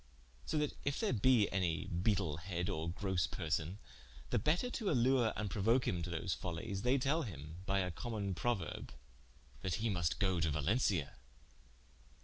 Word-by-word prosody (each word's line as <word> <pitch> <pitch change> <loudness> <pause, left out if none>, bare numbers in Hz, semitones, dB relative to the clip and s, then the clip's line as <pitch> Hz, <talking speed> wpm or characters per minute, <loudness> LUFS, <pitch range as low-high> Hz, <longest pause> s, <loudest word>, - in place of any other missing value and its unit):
So 155 - 0
that 150 -1 +1
if 140 0 -1
there - - +1
be 115 -1 +5
any 90 -4 0
beetlehead 90 -1 -1
or 80 -2 -2
grosse 90 -2 0
person, 80 +3 -2 0.5
the - - +3
better 175 +11 +1
to 215 -5 -1
allure 125 -3 +4
and 105 - -2
prouoke 115 +6 +2
him 90 -2 0
to 85 - -4
those 85 +1 -1
follies, 90 +5 -4
they 125 +4 +3
tell 140 +5 +2
him 80 - -7
by 95 +1 +2
a 90 -1 -1
common 105 -1 -3
Prouerbe: 120 +2 -2 0.7
That 90 - 0
he 110 0 0
must 85 -2 0
go 95 -4 +2
to 80 0 +2
Valencia. 80 - +1
95 Hz, 160 wpm, -36 LUFS, 85-120 Hz, 0.7 s, be